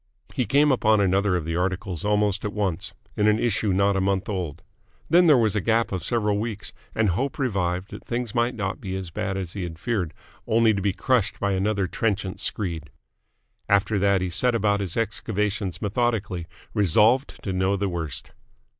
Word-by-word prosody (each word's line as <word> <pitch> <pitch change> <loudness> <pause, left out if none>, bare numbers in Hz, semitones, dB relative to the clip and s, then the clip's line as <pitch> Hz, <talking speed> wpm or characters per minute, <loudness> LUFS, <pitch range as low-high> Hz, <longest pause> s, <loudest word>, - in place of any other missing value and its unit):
He 125 - -1
came 145 +2 +4
upon 110 -4 +3
another 100 0 +2
of 85 -3 -2
the 85 0 -2
articles 90 -1 -2
almost 105 -1 +1
at 105 - -3
once, 100 -2 -2 0.2
in 105 0 +2
an 105 0 +4
issue 110 -3 +1
not 100 +1 +2
a 95 - +1
month 95 0 0
old. 90 -5 -4 0.5
Then 175 +1 +6
there 150 -4 +7
was 110 -3 +2
a 105 - +1
gap 115 +3 +1
of 95 -2 -2
several 105 0 0
weeks, 110 -2 -4 0.2
and 110 -2 +2
hope 130 +10 -1
revived 95 -7 -1
that - - -9
things 120 -2 -3
might 120 +1 +1
not 100 -3 -3
be 95 -1 -4
as 95 -3 -5
bad 95 +4 -2
as 90 -3 -4
he 100 - -4
had 85 -2 -5
feared 95 -5 -2 0.3
only 115 0 +4
to 100 - -2
be 100 0 +1
crushed 115 +1 +1
by 100 - 0
another 100 +1 +1
trenchant 95 +1 -2
screed. 85 -7 -3 0.8
After 100 +1 +3
that 100 -1 +3
he 90 -1 -2
set 120 +8 +2
about 105 -2 +2
his 95 -2 -3
excavations 105 -4 -1
methodically, 105 -5 -1 0.3
resolved 105 - +3
to 95 - -2
know 95 +2 +1
the 100 +1 -1
worst. 85 -5 -5
100 Hz, 190 wpm, -24 LUFS, 95-110 Hz, 0.8 s, there